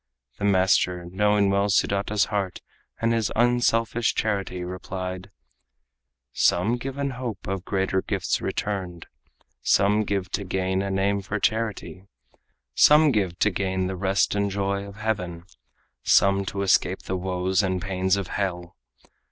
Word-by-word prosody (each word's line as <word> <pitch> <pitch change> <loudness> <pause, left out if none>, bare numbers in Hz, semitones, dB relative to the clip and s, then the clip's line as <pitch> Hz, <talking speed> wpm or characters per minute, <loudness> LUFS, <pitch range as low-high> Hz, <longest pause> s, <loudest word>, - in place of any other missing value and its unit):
The 100 - -1
master, 95 -2 +2
knowing 105 +1 +2
well 100 +1 +1
Sudata's 100 +1 +1
heart 100 -3 -2 0.4
And 115 0 +1
his 115 -3 0
unselfish 120 -1 +2
charity, 100 -4 -2
replied: 90 +1 -6 1.0
"Some 100 +8 +2
give 135 +2 -6
in 140 -1 -1
hope 125 -5 -6
of 95 -2 -3
greater 95 -1 0
gifts - - -1
returned; 95 -5 -3 0.6
Some 105 +2 +3
give 100 -2 -2
to 100 - -2
gain 95 0 -1
a 100 - -2
name 100 +1 0
for 100 +2 -4
charity; 105 -3 -2 0.7
Some 150 - +6
give 95 -7 -1
to 110 - +2
gain 95 0 -1
the 95 +1 -3
rest 95 +1 +1
and 100 0 0
joy 100 0 -2
of 100 - -11
heaven, 95 -6 -3 0.6
Some 100 0 +3
to 100 +1 -3
escape 95 -1 +2
the 95 - -3
woes 95 +1 0
and 95 -2 -1
pains 95 0 0
of 100 - -2
hell. 90 -3 -3
100 Hz, 145 wpm, -25 LUFS, 95-105 Hz, 1.0 s, Some